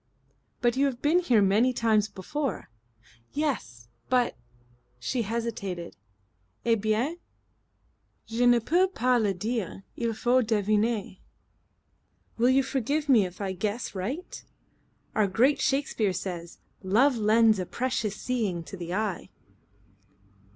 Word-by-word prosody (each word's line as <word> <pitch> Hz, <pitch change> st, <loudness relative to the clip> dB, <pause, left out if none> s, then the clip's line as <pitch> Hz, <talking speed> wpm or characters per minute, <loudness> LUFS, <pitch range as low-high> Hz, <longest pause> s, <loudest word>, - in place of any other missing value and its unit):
"But 240 Hz, 0 st, +2 dB
you've 270 Hz, -3 st, +1 dB
been 315 Hz, +4 st, +4 dB
here 240 Hz, -, +3 dB
many 215 Hz, +6 st, +3 dB
times 220 Hz, -3 st, +2 dB
before." 225 Hz, -, -4 dB, 0.6 s
"Yes. 120 Hz, -, -3 dB, 0.2 s
But 250 Hz, -1 st, +2 dB, 0.3 s
" 120 Hz, 0 st, -36 dB
She 255 Hz, -, 0 dB
hesitated. 210 Hz, -6 st, -4 dB, 0.7 s
"Eh 230 Hz, -, +4 dB
bien?" 225 Hz, +10 st, 0 dB, 1.1 s
"Je 235 Hz, +2 st, +1 dB
ne 240 Hz, 0 st, +6 dB
peux 345 Hz, +11 st, +2 dB
pas 250 Hz, -9 st, +1 dB
le 205 Hz, -2 st, +2 dB
dire. 195 Hz, 0 st, -3 dB
Il 230 Hz, -1 st, -1 dB
faut 250 Hz, +3 st, +3 dB
deviner." 215 Hz, -1 st, 0 dB, 1.2 s
"Will 240 Hz, +2 st, +4 dB
you 265 Hz, +1 st, +4 dB
forgive 275 Hz, +3 st, -1 dB
me 220 Hz, -8 st, +5 dB
if 180 Hz, -, -14 dB
I 195 Hz, -1 st, -2 dB
guess 210 Hz, +6 st, -3 dB
right? 240 Hz, -, -5 dB, 0.7 s
Our 215 Hz, -2 st, +2 dB
great 255 Hz, +9 st, +2 dB
Shakespeare 265 Hz, -8 st, +1 dB
says: 175 Hz, -3 st, -5 dB, 0.2 s
'Love 235 Hz, +8 st, +3 dB
lends 220 Hz, 0 st, +4 dB
a 180 Hz, -, -3 dB
precious 240 Hz, -5 st, -2 dB
seeing 215 Hz, -9 st, -2 dB
to 180 Hz, -, -9 dB
the 175 Hz, -1 st, -5 dB
eye.'" 210 Hz, -3 st, -2 dB
225 Hz, 125 wpm, -27 LUFS, 195-255 Hz, 1.2 s, ne